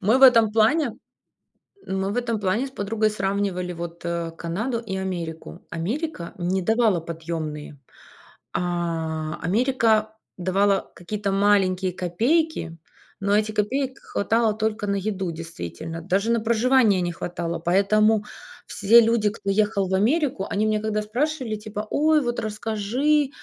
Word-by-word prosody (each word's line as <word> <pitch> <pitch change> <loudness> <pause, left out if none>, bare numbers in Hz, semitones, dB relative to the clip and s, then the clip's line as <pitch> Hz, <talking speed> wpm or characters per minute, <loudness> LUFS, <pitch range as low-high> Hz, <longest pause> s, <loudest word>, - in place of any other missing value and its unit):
Мы 220 +7 +3
в - - 0
этом 230 -5 +7
плане 230 +4 +2 0.9
мы 190 0 -1
в - - -4
этом 235 -3 -1
плане 210 +6 0
с - - -9
подругой 215 -2 0
сравнивали 195 -3 -2
вот, 170 0 -7
э, 170 -1 -2
Канаду 215 +9 -2
и 205 -5 -5
Америку. 175 -4 -5
Америка 200 - -4
не 185 +2 0
давала 220 -2 +3
подъемные. 160 -3 -6 0.8
А, 165 -3 -2
Америка 220 +2 +2 0.2
давала 195 +2 +1
какие-то 200 +3 -3
маленькие 195 -2 +2
копейки, 185 - 0 0.4
но 200 +1 +2
эти 215 0 +1
копеек 260 +6 -1
хватало 225 +1 0
только 215 -1 -2
на 200 - 0
еду 195 -2 -2
действительно, 165 - -7
даже 195 +6 0
на 235 0 +2
проживание 230 -3 +3
не 175 -1 -1
хватало. 170 0 -4
Поэтому 205 +5 +3 0.4
все 225 +4 +5
люди, 225 -2 +2
кто 200 -1 -4
ехал 205 -1 +1
в - - -4
Америку, 240 - +1
они 210 - 0
меня 215 -1 +1
когда 215 0 -1
спрашивали, 250 +1 -2
типа: 210 0 -6
"Ой, 305 0 +3
вот 240 -2 -2
расскажи, 225 +7 0
205 Hz, 140 wpm, -24 LUFS, 180-225 Hz, 0.9 s, этом